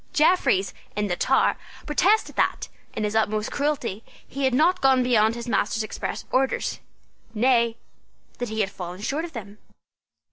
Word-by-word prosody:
Jeffreys, 275 Hz, -, +3 dB, 0.2 s
in 210 Hz, 0 st, 0 dB
the 180 Hz, -3 st, -1 dB
Tower, 265 Hz, +8 st, +2 dB, 0.3 s
protested 385 Hz, +8 st, +2 dB
that, -, -, 0 dB, 0.3 s
in 215 Hz, -, -2 dB
his 210 Hz, +1 st, -1 dB
utmost 215 Hz, -1 st, 0 dB
cruelty, 250 Hz, -8 st, -2 dB, 0.2 s
he 275 Hz, +1 st, -2 dB
had 260 Hz, -, +2 dB
not 355 Hz, +6 st, +3 dB
gone 265 Hz, -1 st, +4 dB
beyond 230 Hz, -2 st, +3 dB
his 235 Hz, 0 st, -6 dB
master's 225 Hz, -1 st, 0 dB
express 215 Hz, -, -5 dB
orders, 265 Hz, +1 st, 0 dB, 0.6 s
nay, 235 Hz, 0 st, +3 dB, 0.6 s
that 245 Hz, -2 st, -3 dB
he 220 Hz, 0 st, -1 dB
had 195 Hz, -1 st, -1 dB
fallen 180 Hz, 0 st, -7 dB
short 290 Hz, +9 st, -2 dB
of 340 Hz, -, -10 dB
them. 210 Hz, -3 st, -9 dB
235 Hz, 155 wpm, -24 LUFS, 210-270 Hz, 0.6 s, gone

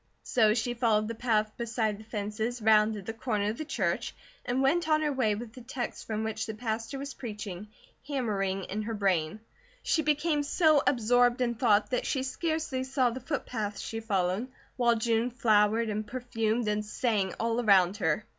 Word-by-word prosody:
So 220 Hz, -3 st, +3 dB
she 240 Hz, +1 st, -1 dB
followed 225 Hz, -3 st, +2 dB
the 230 Hz, -, -3 dB
path 215 Hz, -2 st, 0 dB
beside 225 Hz, -3 st, -1 dB
the -, -, -11 dB
fences, 220 Hz, +2 st, -3 dB
rounded 215 Hz, -2 st, +3 dB
the 225 Hz, -, -4 dB
corner 210 Hz, -3 st, -1 dB
of 225 Hz, -, -9 dB
the 310 Hz, -, -3 dB
church 315 Hz, -, -1 dB, 0.3 s
and 255 Hz, +2 st, 0 dB
went 320 Hz, +4 st, +2 dB
on 310 Hz, 0 st, +3 dB
her 295 Hz, -1 st, 0 dB
way 225 Hz, -6 st, +1 dB
with 225 Hz, +1 st, -8 dB
the 255 Hz, -, -11 dB
text 245 Hz, 0 st, -5 dB
from 220 Hz, 0 st, -2 dB
which 220 Hz, 0 st, -3 dB
the 220 Hz, -, -5 dB
pastor 225 Hz, +3 st, -3 dB
was 275 Hz, 0 st, -6 dB
preaching, 210 Hz, -5 st, -7 dB, 0.4 s
hammering 200 Hz, -9 st, -1 dB
in 210 Hz, +4 st, -4 dB
her 225 Hz, +1 st, -3 dB
brain. 190 Hz, -2 st, 0 dB, 0.4 s
She 320 Hz, -, +2 dB
became 300 Hz, 0 st, +1 dB
so 305 Hz, 0 st, +3 dB
absorbed 245 Hz, 0 st, +3 dB
in 245 Hz, -2 st, +1 dB
thought 220 Hz, -2 st, +2 dB
that 250 Hz, -, 0 dB
she 265 Hz, -, 0 dB
scarcely 310 Hz, -1 st, -2 dB
saw 260 Hz, -2 st, +1 dB
the 250 Hz, -, -5 dB
footpath 235 Hz, -7 st, -3 dB
she 225 Hz, -, -5 dB
followed, 200 Hz, 0 st, 0 dB, 0.3 s
while 240 Hz, -2 st, +3 dB
June 230 Hz, +1 st, +1 dB
flowered, 220 Hz, -1 st, +3 dB
and 210 Hz, 0 st, -3 dB
perfumed, 230 Hz, -1 st, -1 dB
and 210 Hz, 0 st, 0 dB
sang 210 Hz, -3 st, -1 dB
all 230 Hz, +1 st, 0 dB
around 195 Hz, -2 st, +5 dB
her. 185 Hz, +2 st, 0 dB
225 Hz, 185 wpm, -29 LUFS, 210-250 Hz, 0.4 s, around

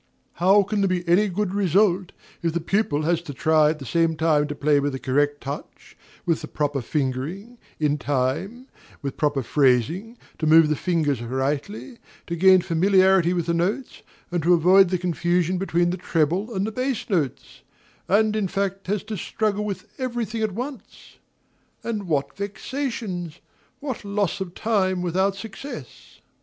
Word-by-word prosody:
How 195 Hz, +3 st, +6 dB
can 205 Hz, +1 st, -1 dB
there 195 Hz, -, +3 dB
be 180 Hz, -1 st, -2 dB
any 185 Hz, +5 st, +4 dB
good 195 Hz, 0 st, -2 dB
result, 190 Hz, -1 st, +2 dB, 0.3 s
if 165 Hz, -1 st, -1 dB
the 170 Hz, -, 0 dB
pupil 170 Hz, -3 st, 0 dB
has 170 Hz, +1 st, +1 dB
to 145 Hz, -5 st, -8 dB
try 155 Hz, +1 st, +4 dB
at 155 Hz, -, -1 dB
the 135 Hz, -, -9 dB
same 165 Hz, +6 st, +1 dB
time 155 Hz, -2 st, +2 dB
to 145 Hz, -, -5 dB
play 145 Hz, 0 st, +2 dB
with 140 Hz, -1 st, -1 dB
a -, -, -5 dB
correct 145 Hz, +3 st, 0 dB
touch, 140 Hz, +1 st, -8 dB, 0.3 s
with 165 Hz, -2 st, +1 dB
the -, -, -6 dB
proper 145 Hz, -2 st, -1 dB
fingering, 150 Hz, -, -3 dB, 0.2 s
in 150 Hz, -1 st, +1 dB
time, 145 Hz, -, -2 dB, 0.4 s
with 140 Hz, -1 st, -3 dB
proper 145 Hz, -3 st, 0 dB
phrasing, 150 Hz, -, +1 dB, 0.2 s
to 155 Hz, -, 0 dB
move 160 Hz, 0 st, +6 dB
the 155 Hz, -, +2 dB
fingers 150 Hz, -6 st, 0 dB
rightly, 140 Hz, -, -3 dB, 0.3 s
to 170 Hz, -, -3 dB
gain 185 Hz, +2 st, +6 dB
familiarity 190 Hz, 0 st, +4 dB
with 175 Hz, -2 st, -1 dB
the 170 Hz, -, 0 dB
notes, 195 Hz, +10 st, -2 dB, 0.3 s
and 175 Hz, -1 st, 0 dB
to 175 Hz, +3 st, +5 dB
avoid 180 Hz, +3 st, +5 dB
the 185 Hz, -, +1 dB
confusion 175 Hz, +1 st, 0 dB
between 175 Hz, -2 st, +1 dB
the 180 Hz, -, -3 dB
treble 175 Hz, +5 st, 0 dB
and 190 Hz, +1 st, 0 dB
the 220 Hz, -, -3 dB
bass 255 Hz, +1 st, -2 dB
notes, 160 Hz, -, -2 dB, 0.5 s
and 215 Hz, +2 st, +3 dB
in 210 Hz, -3 st, 0 dB
fact 195 Hz, 0 st, -3 dB
has 205 Hz, 0 st, -1 dB
to 215 Hz, 0 st, -5 dB
struggle 210 Hz, +3 st, -1 dB
with 200 Hz, -1 st, -5 dB
every 240 Hz, -3 st, -2 dB
thing 220 Hz, +1 st, -5 dB
at 215 Hz, -3 st, 0 dB
once? 260 Hz, +4 st, -8 dB, 0.7 s
And 215 Hz, -4 st, -3 dB
what 145 Hz, -4 st, -1 dB
vexations! 200 Hz, -, -4 dB, 0.4 s
what 270 Hz, -6 st, -5 dB
loss 200 Hz, -1 st, -1 dB
of 180 Hz, -2 st, -5 dB
time 190 Hz, -5 st, 0 dB
without 190 Hz, +3 st, +1 dB
success! 195 Hz, -, -9 dB
180 Hz, 170 wpm, -24 LUFS, 155-205 Hz, 0.7 s, How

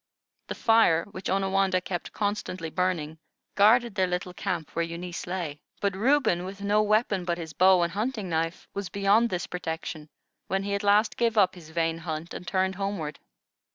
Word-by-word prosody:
The -, -, -4 dB
fire, 225 Hz, -8 st, +4 dB
which 185 Hz, -2 st, -6 dB
Onawandah 195 Hz, -1 st, +2 dB
kept 175 Hz, -1 st, -5 dB
constantly 200 Hz, -5 st, -3 dB
burning, 165 Hz, -4 st, -1 dB, 0.3 s
guarded 230 Hz, +3 st, +5 dB
their 190 Hz, -2 st, +1 dB
little 180 Hz, 0 st, -3 dB
camp 180 Hz, -4 st, -3 dB
where 170 Hz, -, -1 dB
Eunice 170 Hz, +1 st, -5 dB
lay; 170 Hz, -5 st, -4 dB, 0.2 s
but 200 Hz, -2 st, 0 dB
Reuben, 230 Hz, -5 st, +2 dB
with 195 Hz, +2 st, -7 dB
no 205 Hz, +1 st, +3 dB
weapon 215 Hz, -2 st, +2 dB
but 175 Hz, -1 st, -1 dB
his 160 Hz, -3 st, -7 dB
bow 185 Hz, +1 st, +5 dB
and 170 Hz, -, -2 dB
hunting 215 Hz, 0 st, -2 dB
knife, 165 Hz, +1 st, -2 dB
was 200 Hz, -2 st, -4 dB
beyond 200 Hz, +4 st, +3 dB
this 180 Hz, -3 st, -2 dB
protection 160 Hz, -3 st, -5 dB, 0.4 s
when 195 Hz, +1 st, -1 dB
he 200 Hz, 0 st, -2 dB
at 200 Hz, -, 0 dB
last 205 Hz, +1 st, +3 dB
gave 230 Hz, -2 st, +1 dB
up 190 Hz, -3 st, +5 dB
his 170 Hz, -4 st, -13 dB
vain 165 Hz, 0 st, -1 dB
hunt 160 Hz, 0 st, -5 dB
and 180 Hz, -, -8 dB
turned 190 Hz, +1 st, +1 dB
homeward. 195 Hz, -6 st, -4 dB
185 Hz, 180 wpm, -27 LUFS, 170-200 Hz, 0.4 s, guarded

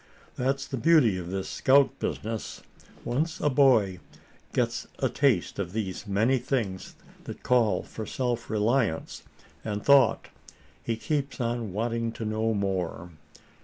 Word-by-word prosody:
That's 135 Hz, +2 st, -1 dB
the 135 Hz, -, -5 dB
beauty 135 Hz, -, +4 dB
of 85 Hz, -1 st, -7 dB
this 95 Hz, 0 st, -3 dB
scout 140 Hz, +1 st, +3 dB
business 110 Hz, -1 st, -4 dB, 0.4 s
once 155 Hz, +6 st, -1 dB
a 150 Hz, -, +1 dB
boy 120 Hz, -9 st, +4 dB, 0.5 s
gets -, -, -1 dB
a -, -, 0 dB
taste 125 Hz, -13 st, +1 dB
of 90 Hz, -2 st, -3 dB
these 105 Hz, -2 st, -4 dB
many 110 Hz, +7 st, +2 dB
things 115 Hz, -8 st, -3 dB, 0.3 s
that -, -, -8 dB
call 120 Hz, -4 st, +2 dB
for 110 Hz, -, -8 dB
self 120 Hz, -2 st, -2 dB
reliance 110 Hz, -4 st, 0 dB, 0.4 s
and 105 Hz, -1 st, -3 dB
thought, 140 Hz, -1 st, +4 dB, 0.5 s
he 115 Hz, -, -2 dB
keeps 145 Hz, +2 st, -2 dB
on 120 Hz, -3 st, -2 dB
wanting 115 Hz, +2 st, -2 dB
to 115 Hz, -, -6 dB
know 110 Hz, +1 st, 0 dB
more. 90 Hz, -3 st, -2 dB
115 Hz, 135 wpm, -27 LUFS, 100-130 Hz, 0.5 s, beauty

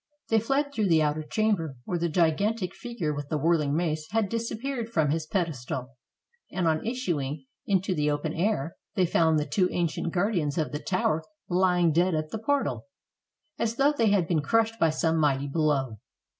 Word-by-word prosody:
They 225 Hz, -, +4 dB
fled 275 Hz, +5 st, 0 dB
through 215 Hz, -6 st, +1 dB
the 160 Hz, -3 st, +4 dB
outer 150 Hz, +1 st, 0 dB
chamber, 165 Hz, -4 st, 0 dB
where 175 Hz, -, -2 dB
the 170 Hz, 0 st, 0 dB
gigantic 185 Hz, +4 st, +1 dB
fig 240 Hz, -1 st, -9 dB
ure 150 Hz, -2 st, +1 dB
with 145 Hz, -1 st, -6 dB
the 155 Hz, -, 0 dB
whirling 150 Hz, -2 st, +2 dB
mace 155 Hz, -2 st, -1 dB
had 215 Hz, 0 st, 0 dB
disappeared 230 Hz, +1 st, -3 dB
from 155 Hz, -9 st, +1 dB
his 160 Hz, 0 st, -2 dB
pedestal, 140 Hz, -9 st, -2 dB, 0.6 s
and 180 Hz, -3 st, 0 dB
on 155 Hz, -1 st, +1 dB
issuing 160 Hz, -, -2 dB, 0.2 s
into 190 Hz, -1 st, +1 dB
the 150 Hz, -3 st, +1 dB
open 150 Hz, +1 st, -1 dB
air, 170 Hz, -4 st, -1 dB, 0.2 s
they 185 Hz, -, +3 dB
found 160 Hz, -2 st, +3 dB
the 150 Hz, -, 0 dB
two 180 Hz, +5 st, +1 dB
ancient 170 Hz, -1 st, -1 dB
guardians 175 Hz, -6 st, 0 dB
of 155 Hz, -, 0 dB
the 150 Hz, -, -3 dB
tower 160 Hz, -3 st, 0 dB, 0.3 s
lying 180 Hz, -2 st, +3 dB
dead 175 Hz, +2 st, +2 dB
at 155 Hz, 0 st, -3 dB
the 220 Hz, -, -3 dB
portal, 285 Hz, +4 st, -1 dB, 0.7 s
as 230 Hz, 0 st, 0 dB
though 275 Hz, +3 st, +4 dB
they 230 Hz, -6 st, +2 dB
had 195 Hz, -5 st, +2 dB
been 165 Hz, -4 st, +1 dB
crushed 225 Hz, +7 st, +1 dB
by 165 Hz, -, +4 dB
some 160 Hz, +1 st, +1 dB
mighty 140 Hz, -2 st, +2 dB
blow. 140 Hz, -6 st, 0 dB
170 Hz, 185 wpm, -27 LUFS, 155-215 Hz, 0.7 s, They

